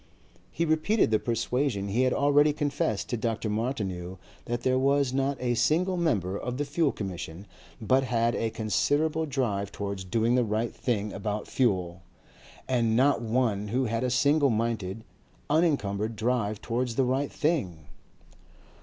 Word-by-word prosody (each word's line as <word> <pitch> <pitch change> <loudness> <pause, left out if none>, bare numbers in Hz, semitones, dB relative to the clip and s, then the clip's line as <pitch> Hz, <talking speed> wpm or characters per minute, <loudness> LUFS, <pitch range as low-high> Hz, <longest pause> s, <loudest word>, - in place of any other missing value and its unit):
He 170 - -1
repeated 160 - +2
the 110 - +3
persuasion 120 -2 -1
he 115 +6 +1
had 130 0 +3
already 145 +2 +4
confessed 145 -8 -1
to 120 - -1
Dr. 115 -1 -2
Martineau 100 -6 -3 0.3
that 120 0 -3
there 130 0 +2
was 140 -1 +2
not 135 +1 0
a 125 -1 0
single 160 +10 +2
member 100 - 0
of 125 0 -4
the 145 - -1
Fuel 145 +1 +1
Commission 90 -2 -6 0.3
but 130 +4 +2
had 120 -1 +1
a 115 - -1
considerable 145 +9 0
drive 110 -8 -1
towards 100 -2 -4
doing 115 +6 +1
the 125 0 +3
right 110 +1 -1
thing 105 -4 -2
about 105 +1 -3
fuel, 95 -8 0 0.7
and 120 -4 +1
not 135 +4 +3
one 110 -3 0
who 125 +5 0
had 115 +1 -1
a 125 - +1
single 140 +3 +3
minded, 110 -3 -2 0.5
unencumbered 115 - +1
drive 110 -2 -1
towards 120 0 -2
the 135 - +2
right 135 +3 0
thing. 105 - -1
120 Hz, 155 wpm, -27 LUFS, 105-140 Hz, 0.7 s, already